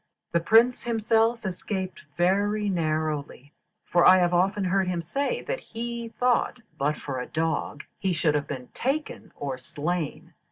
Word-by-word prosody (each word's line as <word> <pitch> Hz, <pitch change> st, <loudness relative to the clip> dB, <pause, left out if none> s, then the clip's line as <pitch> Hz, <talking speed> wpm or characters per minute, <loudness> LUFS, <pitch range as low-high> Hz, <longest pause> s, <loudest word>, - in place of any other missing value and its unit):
The 170 Hz, -, +3 dB
Prince 225 Hz, +8 st, +4 dB
himself 225 Hz, 0 st, +1 dB
escaped 185 Hz, -1 st, -4 dB
very 205 Hz, +4 st, +2 dB
narrowly, 155 Hz, -5 st, -2 dB, 0.3 s
for 175 Hz, 0 st, +3 dB
I 185 Hz, -, +8 dB
have 175 Hz, -1 st, +2 dB
often 195 Hz, +3 st, +2 dB
heard 190 Hz, 0 st, +1 dB
him 180 Hz, -1 st, -1 dB
say 280 Hz, -, -2 dB
that -, -, -3 dB
he 235 Hz, 0 st, -5 dB
thought 245 Hz, +1 st, +1 dB, 0.2 s
but 145 Hz, +2 st, +1 dB
for 135 Hz, -3 st, -4 dB
a 125 Hz, -, -4 dB
dog 155 Hz, -2 st, -2 dB, 0.2 s
he 190 Hz, -, 0 dB
should 155 Hz, -2 st, +2 dB
have 150 Hz, -1 st, -1 dB
been 130 Hz, -3 st, -6 dB
taken 280 Hz, +4 st, -3 dB
or 135 Hz, -2 st, -4 dB
slain. 160 Hz, +3 st, -4 dB
180 Hz, 155 wpm, -26 LUFS, 155-225 Hz, 0.3 s, I